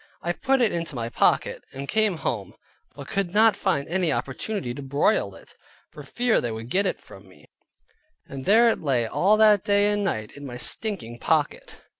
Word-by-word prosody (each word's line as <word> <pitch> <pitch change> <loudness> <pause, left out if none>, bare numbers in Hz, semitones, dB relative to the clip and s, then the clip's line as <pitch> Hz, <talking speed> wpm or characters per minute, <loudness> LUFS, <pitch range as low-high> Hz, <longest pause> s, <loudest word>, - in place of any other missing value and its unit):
I 170 - 0
put 270 +6 +1
it 230 - +3
into 165 -3 -3
my 115 -1 -3
pocket, - - +1
and 140 +1 -6
came 215 -2 +1
home, 105 -10 -4 0.4
but 140 -1 -9
could 195 -1 -2
not 220 0 +5
find 140 -8 -1
an 185 +3 -1
opportunity 140 - -3
to 140 - -8
broil 140 +9 0
it, - - -16 0.4
for - - -11
fear 245 -2 0
they 120 - -3
would 110 +2 -7
get 195 +1 +2
it - - -3
from 95 0 -15
me, 75 -5 -19 0.8
and 135 -1 -8
there 225 +4 +5
it - - -1
lay 130 -6 +1
all 195 - +2
that 215 -3 +5
day 205 0 +3
and 205 0 -1
night 110 - -2
in 145 - -12
my 125 -3 -7
stinking 125 - -3
pocket. - - -1
170 Hz, 195 wpm, -24 LUFS, 125-210 Hz, 0.8 s, not